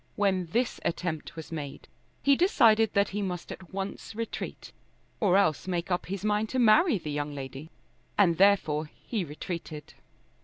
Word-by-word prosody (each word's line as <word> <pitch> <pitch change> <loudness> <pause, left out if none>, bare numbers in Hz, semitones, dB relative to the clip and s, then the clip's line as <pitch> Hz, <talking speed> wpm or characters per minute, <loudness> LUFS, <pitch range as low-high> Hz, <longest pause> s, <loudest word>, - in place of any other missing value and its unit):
When 190 -3 +1
this 235 +9 0
attempt 170 -2 -3
was 160 0 -8
made 145 -4 -6 0.4
he 280 0 +5
decided 225 - +4
that 200 0 +3
he 205 +2 -3
must 180 -3 -4
at 185 - -10
once 195 +2 -5
retreat, 230 0 -5 0.5
or 195 -3 +4
else 160 -4 +2
make 175 0 -2
up 180 - -1
his 195 +2 -4
mind 210 +1 +1
to 260 - -2
marry 250 - +5
the 155 -4 -6
young 145 0 -3
lady. 135 +3 -7 0.5
And 175 -5 +4
therefore 160 -6 +4 0.2
he 220 -6 -1
retreated. 155 0 -7
185 Hz, 160 wpm, -28 LUFS, 160-210 Hz, 0.5 s, he